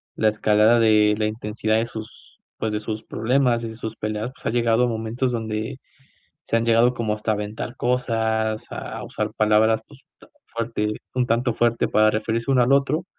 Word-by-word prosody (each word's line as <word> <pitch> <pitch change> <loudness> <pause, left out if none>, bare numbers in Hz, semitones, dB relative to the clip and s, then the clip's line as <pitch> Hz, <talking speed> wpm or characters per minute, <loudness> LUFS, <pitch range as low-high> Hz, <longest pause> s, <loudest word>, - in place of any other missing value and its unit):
la 110 - +3
escalada 110 +2 +3
de 105 -2 +4
la 110 - 0
intensidad 110 0 -1
de 115 +1 0
sus, 110 -2 -11 0.2
pues, 110 - -2
de 105 - -1
sus 110 0 -5
problemas 120 0 +1
y 115 - -4
de 110 - -9
sus 110 -1 -6
peleas, 110 +2 -3
pues, - - -19
ha - - +1
llegado 115 0 +2
a - - +3
momentos 115 +3 -2
donde 110 +2 -3 0.7
se 115 - 0
han 115 - 0
llegado 115 +2 +4
como 110 -4 -1
hasta 105 +1 -2
aventar 105 +3 -4
cosas, 110 -3 0
a - - -6
usar - - -3
palabras, 110 +1 +3
pues, 140 -2 -18 0.4
fuerte, 115 -2 -2 0.2
un 125 -1 +2
tanto 120 +1 +1
fuerte 115 0 +1
para 110 0 +4
referirse 115 +4 -1
uno 130 -2 +4
al 125 +3 +3
otro, 140 +5 +1
110 Hz, 185 wpm, -23 LUFS, 110-120 Hz, 0.7 s, de